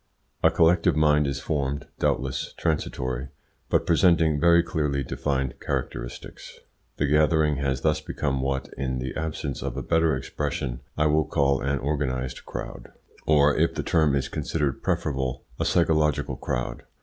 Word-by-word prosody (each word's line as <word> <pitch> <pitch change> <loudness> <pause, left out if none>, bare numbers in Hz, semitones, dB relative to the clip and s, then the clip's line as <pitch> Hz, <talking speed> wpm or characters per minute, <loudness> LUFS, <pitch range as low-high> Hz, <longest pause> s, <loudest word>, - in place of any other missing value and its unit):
A - - +6
collective 80 -2 +3
mind 75 -1 +3
is 70 0 -2
formed, 70 -1 -2
doubtless 65 0 -1
transitory, 65 -5 -2 0.4
but - - +2
presenting 80 -3 +4
very 85 +1 +5
clearly 75 -4 -1
defined 65 0 -2
characteristics. - - -5 0.4
The 75 - +1
gathering 75 0 +3
has 65 -2 -1
thus 75 +1 +1
become 70 -3 -2
what, 65 0 -2
in 65 -1 -2
the 65 +1 -4
absence 75 -3 -3
of - - -4
a - - -3
better 80 -3 +2
expression, 65 -2 -3 0.2
I 75 - +2
will 75 0 +3
call 70 -3 +1
an 70 +1 0
organised 65 -3 -2
crowd, - - -7 0.4
or, 75 -1 +5
if 80 +2 +1
the - - -2
term 80 -4 +2
is 70 -1 0
considered 75 -2 -2
preferable, 65 -3 -1 0.2
a - - 0
psychological 80 -4 +2
crowd. 60 - -3
70 Hz, 150 wpm, -25 LUFS, 65-80 Hz, 0.4 s, A